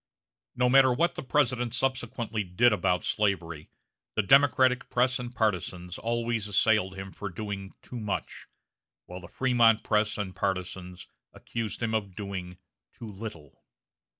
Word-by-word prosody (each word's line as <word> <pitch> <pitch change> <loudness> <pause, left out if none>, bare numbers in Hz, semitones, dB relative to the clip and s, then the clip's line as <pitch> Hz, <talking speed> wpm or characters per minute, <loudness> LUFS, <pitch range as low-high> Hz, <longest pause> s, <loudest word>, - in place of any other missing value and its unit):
No 125 0 +2
matter 130 0 +6
what 165 +8 +1
the - - -6
President 125 -3 +1
subsequently 120 -4 -2
did 105 +6 +3
about 90 -3 +1
slavery, 85 -7 -1 0.5
the 110 - +2
Democratic 130 +1 +4
press 125 +1 +2
and 120 -1 -5
partizans 90 -5 -2
always 115 -2 -1
assailed 100 -1 +2
him 95 0 -7
for 105 - -6
doing 100 +1 -6
too 125 - -7
much, 105 -3 -4 0.6
while 90 +1 -8
the 90 - -11
Frémont 120 -3 +3
press 105 0 +1
and 95 -3 -4
partizans 90 -1 -4 0.3
accused 115 0 -5
him 115 -1 -1
of 100 -4 -2
doing 95 -3 -6 0.4
too 110 -2 -9
little. 95 -8 -9
110 Hz, 140 wpm, -28 LUFS, 95-120 Hz, 0.6 s, matter